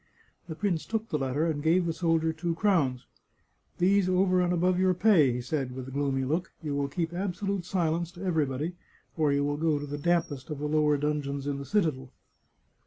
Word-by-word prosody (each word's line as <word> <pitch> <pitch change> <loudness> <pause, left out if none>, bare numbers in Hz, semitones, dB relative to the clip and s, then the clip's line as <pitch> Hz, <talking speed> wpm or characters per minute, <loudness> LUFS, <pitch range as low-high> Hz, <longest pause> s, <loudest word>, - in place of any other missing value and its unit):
" - - -33
The 160 - -4
prince 175 -3 -1
took 225 0 -2
the 150 - -1
letter 135 +4 0
and 155 -3 -1
gave 170 +4 +3
the 165 - -1
soldier 160 -1 +1
two 165 +1 -2
crowns. 155 - +1 0.4
" - - -42 0.3
These 190 +1 +3
over 185 0 +3
and 180 0 +1
above 180 +1 +2
your 185 -1 +3
pay," 180 - +5
he 125 +1 -3
said, 125 0 -3
with 130 -1 -6
a - - -8
gloomy 135 -1 0
look. 165 +7 -1
" - - -30
You 150 -2 -2
will 140 0 0
keep 165 +4 -3
absolute 195 0 -2
silence 170 -2 -1
to 175 +2 -9
every 160 -5 +1
body, 145 +7 -3 0.4
or 155 -3 +2
you 140 0 +1
will 145 0 -1
go 155 -1 +1
to 145 - -4
the 145 0 -5
dampest 160 -5 0
of 150 - -4
the 145 - -4
lower 150 -1 +3
dungeons 140 -1 -2
in 140 -1 -2
the 140 - -6
citadel." 150 -11 0
160 Hz, 225 wpm, -28 LUFS, 145-180 Hz, 0.4 s, pay